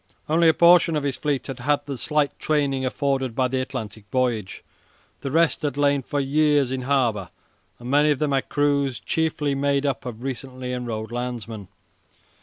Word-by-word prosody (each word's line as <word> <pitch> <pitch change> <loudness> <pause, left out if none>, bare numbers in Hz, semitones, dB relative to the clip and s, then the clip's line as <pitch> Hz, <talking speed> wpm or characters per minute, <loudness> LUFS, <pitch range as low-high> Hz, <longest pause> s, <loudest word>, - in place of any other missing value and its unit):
Only 165 +2 +4
a - - +5
portion 170 -1 +6
of 150 - -1
his 140 -2 -1
fleet 145 -4 -2
had 135 -2 -6
had 145 +4 0
the 140 -1 -4
slight 150 +3 0
training 140 -3 0
afforded 135 -2 -1
by 130 0 +2
the 130 +1 -1
Atlantic 110 -5 -6
voyage. 120 -6 -1 0.6
The 135 - -4
rest 165 +3 +2
had 145 -3 -2
lain 145 -1 +2
for 145 +3 -3
years 145 -1 +2
in 130 -1 -2
harbour, 125 -7 0 0.5
and 120 - -10
many 145 +2 +4
of 145 - +2
them 150 +1 0
had 135 -1 0
crews 140 -3 +1
chiefly 155 -3 -1
made 140 0 +1
up 135 -2 -2
of 120 0 -7
recently 130 -1 -5
enrolled 115 -3 -4
landsmen. 120 -4 -5
135 Hz, 180 wpm, -23 LUFS, 125-145 Hz, 0.6 s, portion